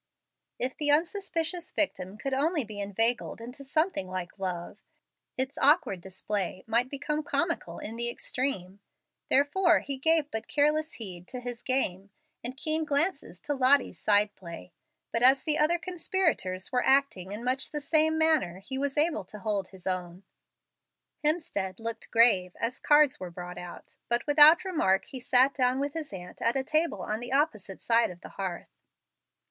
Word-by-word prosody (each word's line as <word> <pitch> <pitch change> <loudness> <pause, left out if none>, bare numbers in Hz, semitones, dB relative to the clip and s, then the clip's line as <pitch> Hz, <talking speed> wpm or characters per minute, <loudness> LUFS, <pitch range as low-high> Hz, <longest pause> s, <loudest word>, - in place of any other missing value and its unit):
If 255 +1 -2
the 295 -1 -1
unsuspicious 340 +1 0
victim 190 -9 -1
could 270 +4 -4
only 300 +3 +1
be 210 -2 -9
inveigled 225 +5 +1
into 250 +4 -10
something 310 - 0
like 185 +1 -6
love, 180 -3 -4 0.6
its 265 +2 -3
awkward 290 - +3
display 190 0 -3
might 235 +3 +1
become 300 +2 -3
comical 295 - -2
in 225 +2 -7
the 235 0 -2
extreme. 240 -7 -3 0.5
Therefore, 330 +5 +3
he 275 -1 -5
gave 320 0 +2
but 220 - -5
careless 305 +2 +1
heed 180 -6 -7
to 250 - -7
his 245 -1 -7
game, 200 -7 -1 0.3
and 250 +2 -6
keen 315 +2 -1
glances 305 +5 -1
to 290 - -2
Lottie's 260 - +2
side 205 +4 +3
play. 170 -1 -11 0.4
But 230 - 0
as 260 +1 +6
the 305 0 0
other 310 +3 +3
conspirators 335 - -2
were 250 -1 +1
acting 265 -9 +1
in 210 +3 -6
much 255 +2 0
the 300 - -4
same 315 +2 +2
manner 315 - +2
he 265 +8 -6
was 280 0 -2
able 305 - +1
to 210 - -10
hold 205 -2 -2
his 185 -2 -15
own. 185 0 -4 1.0
Hemstead 295 - -1
looked 225 0 -5
grave, 200 -6 +4
as 235 +3 -3
cards 295 -2 +4
were 185 - -6
brought 180 +1 -8
out, 175 -1 -11
but 240 0 0
without 305 +6 +8
remark 195 - +1
he 260 - -8
sat 255 +2 +4
down 255 -1 +1
with 285 0 -2
his 320 -3 -5
aunt 180 -2 -10
at 235 +3 +1
a 265 - 0
table 310 - 0
on 215 +1 -3
the 245 +1 -6
opposite 240 -9 -1
side 230 0 +3
of 175 -1 -11
the - - -10
hearth. 185 -3 -6
255 Hz, 170 wpm, -28 LUFS, 195-295 Hz, 1.0 s, without